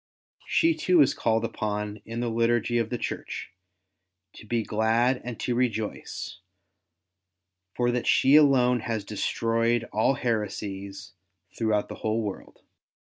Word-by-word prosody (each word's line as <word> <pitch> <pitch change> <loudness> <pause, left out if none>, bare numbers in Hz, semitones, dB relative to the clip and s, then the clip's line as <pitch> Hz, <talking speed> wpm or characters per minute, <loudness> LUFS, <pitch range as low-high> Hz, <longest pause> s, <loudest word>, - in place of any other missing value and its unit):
She 330 0 +3
too 180 - +2
is 135 - +1
called 115 0 0
upon 105 -2 -3
in 115 +1 -4
the 120 - -1
liturgy 120 +1 +1
of 115 -1 -1
the 120 - -2
Church, - - -5 0.8
to 110 - -13
be 115 0 0
glad 115 +4 +1
and 120 -2 -6
to 125 - -1
rejoice, 110 -7 -3 1.4
for 120 0 +1
that 120 0 -2
She 135 +2 +5
alone 130 -5 +5
has 110 -2 -3
destroyed 115 +3 0
all 110 +6 +2
heresies 100 -6 -4 0.4
throughout 110 -2 0
the - - -7
whole 110 +1 0
world. 100 -2 -7
115 Hz, 130 wpm, -26 LUFS, 110-120 Hz, 1.4 s, She